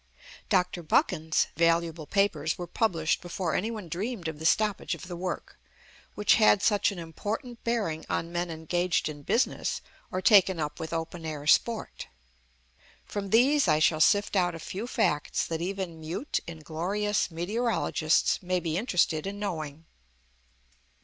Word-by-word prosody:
Dr. 180 -3 +1
Buchan's 160 0 +2
valuable 165 -2 +1
papers 165 -6 +1
were 175 - -4
published 170 -3 0
before 175 -1 -3
any 215 - 0
one 215 -6 -6
dreamed 190 +2 -4
of 160 -2 -5
the 160 - +1
stoppage 210 +4 +1
of - - -10
the 180 - -6
work, 180 +1 -5 0.6
which 210 - +4
had 215 -2 +5
such 205 -2 +3
an 200 - -8
important 215 - -5
bearing 210 -10 -1
on 165 - -2
men 175 0 -2
engaged 175 +2 0
in 145 -1 -8
business 230 - 0 0.3
or 185 - -2
taken 190 -3 +5
up 150 -1 -3
with 160 - -5
open 165 +1 -4
air 150 -2 -5
sport. 225 +8 +1 1.0
From 200 -1 -4
these 270 +7 +4
I 150 - +4
shall 155 0 +3
sift 205 +4 +3
out 175 -3 +2
a - - -7
few 195 +8 -5
facts 150 - 0
that 165 0 -3
even 185 -2 -4
"mute, 170 - -2
inglorious" 175 +7 -2
meteorologists 175 -2 +1
may 180 0 0
be 170 0 -1
interested 180 -7 +1
in 200 +1 -5
knowing. 160 -6 -5
175 Hz, 150 wpm, -28 LUFS, 160-205 Hz, 1.0 s, had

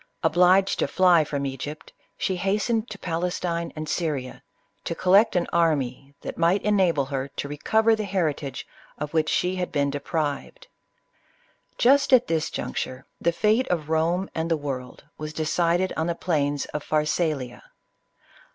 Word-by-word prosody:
Obliged 180 +4 +4
to - - +2
fly 180 -3 +4
from 140 -2 -3
Egypt, 140 +3 -6 0.2
she 190 - -1
hastened 210 +5 0
to 205 - -7
Palestine 170 -1 -2
and 155 0 -5
Syria, 150 -5 -3 0.4
to 170 - -3
collect 195 +5 +4
an 175 -1 +2
army 140 -5 0
that - - -7
might 175 +4 +3
enable 185 -9 +2
her 135 0 -3
to 140 - -6
recover 220 +10 +2
the 215 -1 -3
heritage 160 -7 -2 0.3
of 150 +1 -5
which 155 -1 +2
she 180 +1 0
had 180 -1 -2
been 140 -1 +1
deprived. 150 - -3 1.1
Just 275 +2 +4
at 250 -1 +6
this 160 -1 -1
juncture, 130 +1 -4 0.2
the 170 - +2
fate 220 +8 +2
of 155 -4 -2
Rome 170 +4 +1
and 165 +1 -2
of 165 - +3
the 145 - -12
world 130 -3 -5 0.2
was 155 0 -5
decided 170 +3 +1
on 160 +1 -1
the 170 - -1
plains 145 -5 0
of 150 - -3
Pharsalia. 150 -4 -1
165 Hz, 155 wpm, -25 LUFS, 145-185 Hz, 1.1 s, at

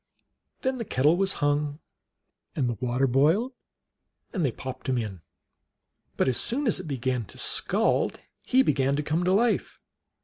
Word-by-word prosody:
Then 260 -1 -1
the - - -1
kettle 150 - +3
was 190 +1 +1
hung 145 0 0 0.8
and 135 -4 +1
the 120 - 0
water 125 +2 +1
boiled, 160 - +2 0.8
and 185 -6 -1
they 135 - +2
popped 130 +3 -7
him 130 - +1
in. 105 -7 -4 1.0
But - - +2
as 130 - +2
soon 270 +5 -1
as 225 - +3
it 185 - -7
began 130 -3 -1
to - - -15
scald - - +1 0.2
he 260 +1 +4
began 140 - +1
to 150 - -1
come 155 +4 0
to 180 - +2
life. 225 +4 +1
145 Hz, 165 wpm, -27 LUFS, 130-190 Hz, 1.0 s, he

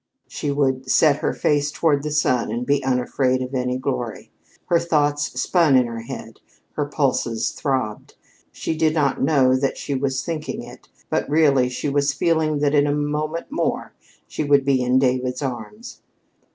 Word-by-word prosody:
She 145 - -4
would 135 -2 0
set 145 +1 +4
her - - -1
face 145 0 0
toward 150 -2 +1
the 150 - -3
sun 130 -5 +1
and 120 +2 -3
be 140 0 +1
unafraid 130 0 0
of 130 +1 -7
any 125 -1 -1
glory. 130 -3 -4 0.3
Her 170 - +3
thoughts 150 -3 0
spun 165 -6 +3
in 125 -1 +5
her 115 -1 -5
head, 115 - -8 0.3
her 145 -1 -2
pulses 130 -6 0
throbbed. 130 -7 -3 0.4
She 160 - -3
did 160 0 +1
not 145 -4 +1
know 135 -3 +3
that 135 +1 -1
she 140 - -4
was 130 0 -1
thinking 160 -2 -4
it, - - -13 0.2
but - - 0
really 140 -5 +3
she 125 - -4
was 140 0 +1
feeling 155 0 +1
that 145 0 +2
in 145 -1 +4
a - - +1
moment 150 +2 -3
more - - -2 0.3
she - - -3
would 140 -2 +3
be 135 -2 +2
in 125 +1 +2
David's 130 0 0
arms. 135 - -7
140 Hz, 175 wpm, -22 LUFS, 130-150 Hz, 0.4 s, in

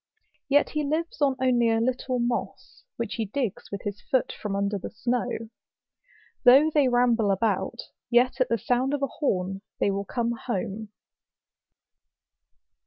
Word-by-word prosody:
Yet 290 +1 +3
he 300 0 -1
lives 310 +2 -2
on 275 -2 +3
only 245 -3 +3
a 225 0 +2
little 255 +2 -1
moss, 240 0 -3
which 230 -3 -3
he 225 - -1
digs 225 -1 -3
with 200 - -5
his 205 0 -5
foot 260 - 0
from 205 -2 -4
under 200 0 -1
the - - -6
snow. 245 +2 -1 1.2
Though 270 +5 +7
they 290 -3 +4
ramble 245 -3 +3
about, 195 +2 0 0.3
yet 250 +2 +3
at 255 - +2
the 230 - +2
sound 245 +5 0
of 280 - -4
a - - +2
horn 195 -7 0 0.2
they 200 - +2
will 200 +1 -3
come 235 +3 -1
home. 220 -2 -4
240 Hz, 155 wpm, -26 LUFS, 205-260 Hz, 1.2 s, Though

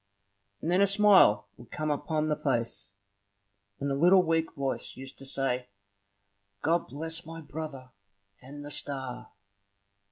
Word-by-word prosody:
and 165 - 0
then 185 +2 +4
a 200 - +6
smile 195 - +6
would 120 - -14
come 155 -1 -2
upon 155 +1 -1
the 150 - +1
face, 115 -7 -2 0.9
and 140 0 -1
a - - +2
little 180 +6 +6
weak 165 -1 +1
voice 135 -2 -3
used 135 +1 -8
to 135 - -8
say, 130 -2 -1 1.0
"God 170 +2 +2
bless 160 +5 -5
my 165 +1 -8
brother 150 -5 -7 0.5
and 145 +3 -10
the 145 - -7
star!" 130 -4 -3
145 Hz, 140 wpm, -29 LUFS, 135-165 Hz, 1.0 s, a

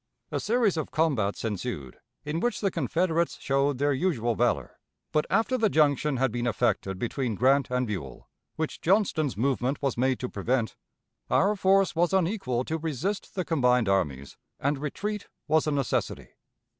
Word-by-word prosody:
A - - -1
series 220 -5 +1
of 155 - -2
combats 130 -12 0
ensued, 95 - -4 0.3
in 150 +2 -2
which 240 +6 0
the 195 -2 0
Confederates 165 +2 0
showed 140 0 +1
their 145 +2 +2
usual 130 -6 0
valor; 120 +2 0 0.3
but, 150 - +1
after 250 +3 +1
the 220 -2 +3
junction 150 -3 +2
had 130 -1 +1
been 120 +1 -2
effected 95 -3 0
between 120 +2 -2
Grant 135 +4 +3
and 125 0 0
Buell, 80 - -6 0.3
which 160 -1 -3
Johnston's 165 - +1
movement 130 +2 0
was 135 -4 -1
made 130 0 +2
to 125 - -2
prevent, 115 +2 -1 0.5
our 205 +2 +3
force 195 -1 +3
was 175 +2 +2
unequal 170 - 0
to 160 +4 -3
resist 165 - -3
the 185 -2 -1
combined 125 -7 +2
armies, 70 -8 -1 0.2
and 140 0 0
retreat 205 +8 -4 0.2
was 155 0 +2
a - - +2
necessity. 140 -4 -1
140 Hz, 160 wpm, -27 LUFS, 120-170 Hz, 0.5 s, the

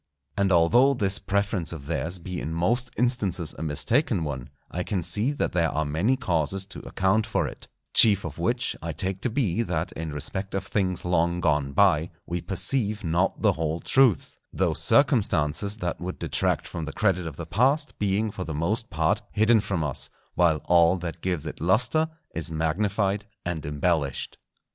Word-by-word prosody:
And 100 -1 +1
although 120 +11 +5
this 100 -4 0
preference 100 -3 -1
of 80 -5 -8
theirs 85 +3 -2
be 90 +1 -6
in 80 +2 -4
most 120 +9 0
instances 100 - 0
a - - -6
mistaken 90 - +1
one, 65 -5 -5 0.2
I 90 - -2
can 90 -1 -2
see 105 - +1
that 145 - -1
there 85 -2 +1
are 80 0 -1
many 80 - +1
causes 95 - -1
to - - -7
account 95 +3 +1
for - - 0
it; - - -10 0.3
chief 105 -4 +6
of 80 -1 -7
which 120 +8 0
I 85 0 -4
take 95 +4 -2
to 125 - 0
be 115 -5 0
that 85 -6 -2
in 80 -1 -5
respect 95 +7 -3
of 95 0 -2
things 95 -3 -1
long 85 0 +1
gone 75 -5 +1
by 85 -2 +3 0.2
we 85 0 -3
perceive 105 +2 -1
not 85 +3 0
the - - +5
whole 80 +1 -2
truth, 125 - +2
those - - 0
circumstances 105 - +2
that 90 -5 -3
would 90 +1 -4
detract - - 0
from 80 -2 -5
the 80 - -6
credit 90 -5 +1
of 75 - -7
the 85 - -6
past 135 - +1
being 105 +2 0
for 95 - -5
the 80 -4 -5
most 105 +9 -1
part 80 -4 +1
hidden 110 +2 +4
from 100 -5 -2
us, 75 -4 -3 0.2
while 80 -3 +2
all 85 0 +5
that 85 -1 -6
gives 90 -5 -2
it - - -7
lustre 125 - +3 0.3
is 80 0 -2
magnified 100 +6 0 0.2
and 85 -4 -3
embellished. 75 -1 -1
90 Hz, 180 wpm, -26 LUFS, 80-105 Hz, 0.3 s, chief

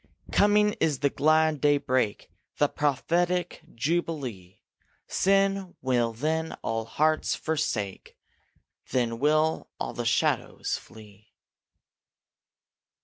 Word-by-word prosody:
Coming 210 0 +4
is 145 -5 0
the 140 -1 +2
glad 155 0 +2
daybreak, 135 -7 +1 0.3
The 145 - +4
prophetic 170 +6 0
jubilee; 130 - -3 0.5
Sin 195 -1 +1
will 120 -3 +1
then 160 +7 -2
all 115 0 -2
hearts 155 +7 +1
forsake, 135 -11 -3 0.7
Then 115 -2 0
will 155 +3 +1
all - - -3
the - - -4
shadows - - 0
flee. 105 -1 -14
150 Hz, 90 wpm, -27 LUFS, 120-160 Hz, 0.7 s, Coming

